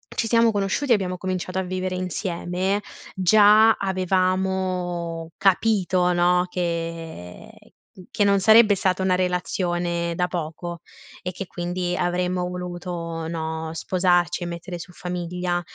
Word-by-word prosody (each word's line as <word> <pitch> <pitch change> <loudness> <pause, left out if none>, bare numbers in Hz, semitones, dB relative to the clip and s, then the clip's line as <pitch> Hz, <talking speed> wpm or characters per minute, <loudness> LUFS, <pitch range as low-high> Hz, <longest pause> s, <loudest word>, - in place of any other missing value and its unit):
ci 225 - 0
siamo 230 0 +4
conosciuti, 205 +7 -1
e - - +8
abbiamo 185 -3 -2
cominciato 185 0 -3
a - - +1
vivere 185 0 -3
insieme, 185 +2 -2 0.3
già 210 +4 +6
avevamo 185 -3 -1
capito, 190 -2 +2
no, 180 +1 +3
che 165 - -5 0.6
che 205 - +1
non 200 -1 +4
sarebbe 220 +1 +6
stata 185 0 0
una 185 -1 +3
relazione 175 -1 -1
da 180 +1 0
poco 170 0 -5 0.4
e 180 - -4
che 195 +1 -6
quindi 175 0 -3
avremmo 180 0 0
voluto, 175 -2 -5
no, 160 -1 -4
sposarci, 175 +1 +1
e - - -3
mettere 175 +1 -6
su 180 +2 -10
famiglia. 180 0 -3
180 Hz, 125 wpm, -23 LUFS, 175-190 Hz, 0.6 s, e